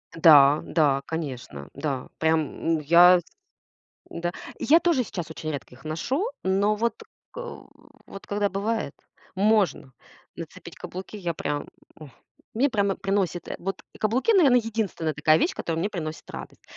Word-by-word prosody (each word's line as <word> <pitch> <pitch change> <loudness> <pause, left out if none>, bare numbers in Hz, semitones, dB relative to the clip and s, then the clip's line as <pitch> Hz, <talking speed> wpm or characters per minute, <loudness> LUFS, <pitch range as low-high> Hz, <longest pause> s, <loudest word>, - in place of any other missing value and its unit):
Да, 150 -3 +7
да, 140 -4 +2
конечно. 130 - -6
Да, 140 -4 -3
прям 160 0 0
я, 175 +4 +7
с 175 - -12 0.9
Да. 175 +1 -3 0.3
Я 325 +4 +5
тоже 330 -8 +2
сейчас 175 -7 -6
очень 155 -1 -5
редко 135 -3 -7
их 125 - -19
ношу. 260 - -1 0.2
Но 200 +3 +2
вот, 230 +2 -2 0.3
к - - -15 0.7
вот 195 - -11
когда 205 0 0
бывает, 205 -4 -2 0.4
можно 195 - +1 0.4
нацепить - - -10
каблуки. 190 +3 -8
Я 175 -4 -3
прям, 145 -1 -3 0.3
ох, 150 -3 -11 0.4
мне 265 +6 +2
прямо 200 -4 +1
приносит 195 -3 -1
эт - - -4
Вот 195 +2 -4 0.2
каблуки, 250 - +2
наверное, 275 -10 +6
единственная 215 -8 -2
такая 155 +1 +4
вещь, 365 - +1
которая 165 - -3
мне 200 +5 -1
приносит 160 -5 -6
радость. - - -9
175 Hz, 145 wpm, -25 LUFS, 155-215 Hz, 0.9 s, Да